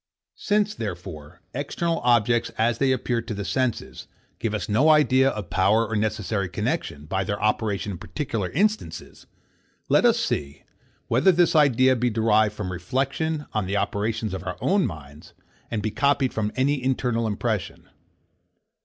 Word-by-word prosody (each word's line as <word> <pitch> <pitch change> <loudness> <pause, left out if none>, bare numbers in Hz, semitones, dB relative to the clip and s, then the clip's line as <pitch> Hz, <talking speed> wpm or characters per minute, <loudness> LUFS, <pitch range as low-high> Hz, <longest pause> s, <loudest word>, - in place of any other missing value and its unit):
Since, 210 0 +1
therefore, 90 - -7
external 165 +5 -2
objects 120 -1 +2
as 115 0 +1
they 135 -1 +3
appear 120 -2 0
to 115 -1 -6
the 100 0 -4
senses, 130 +1 -2 0.3
give 110 -2 -1
us 105 - -3
no 130 +9 +3
idea 135 -3 +5
of 105 -8 -6
power 105 +5 +3
or 110 - -3
necessary 105 -2 -1
connexion, 75 -3 -3
by 95 +4 -1
their 100 +2 -3
operation 105 -1 0
in 90 - -6
particular 115 - -3
instances, 210 - -2 0.6
let - - +4
us 235 -1 +5
see, 70 - -3 0.4
whether 130 +11 +4
this 175 -1 +3
idea 130 -3 +5
be 125 0 +1
derived 110 -2 +2
from 95 -4 -4
reflection 140 - -2
on 110 -4 -1
the 100 +2 -1
operations 110 0 -2
of 95 -1 -5
our 90 -1 -5
own 195 -1 +2
minds, 75 -2 -11 0.4
and 110 -3 -3
be 110 - -1
copied 140 0 +1
from 105 -1 -1
any 135 +1 +1
internal 125 -3 0
impression. 110 -1 -3
115 Hz, 155 wpm, -24 LUFS, 100-135 Hz, 0.6 s, idea